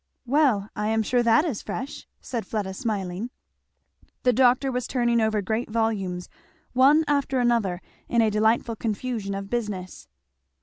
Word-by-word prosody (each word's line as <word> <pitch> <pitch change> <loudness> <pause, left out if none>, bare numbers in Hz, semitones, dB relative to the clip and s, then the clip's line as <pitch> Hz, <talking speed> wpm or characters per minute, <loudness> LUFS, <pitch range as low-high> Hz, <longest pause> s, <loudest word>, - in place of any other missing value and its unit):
"Well 250 -7 +2
I 210 0 -1
am 220 0 +1
sure 245 +3 +2
that 235 +6 +4
is 275 - -2
fresh," 260 +7 -6
said 235 -3 -5
Fleda 205 -3 -3
smiling. 200 0 -3 0.9
The 250 - +4
doctor 255 +2 +3
was 250 -1 -2
turning 240 -2 +1
over 215 -2 +1
great 220 +5 -2
volumes 205 -6 -1 0.5
one 285 +5 +5
after 280 -2 +1
another 230 -7 +1 0.3
in 235 -1 +3
a 220 - +2
delightful 220 +2 +2
confusion 215 -2 -3
of 195 0 -6
business. 210 -6 -4
225 Hz, 145 wpm, -25 LUFS, 205-250 Hz, 0.9 s, one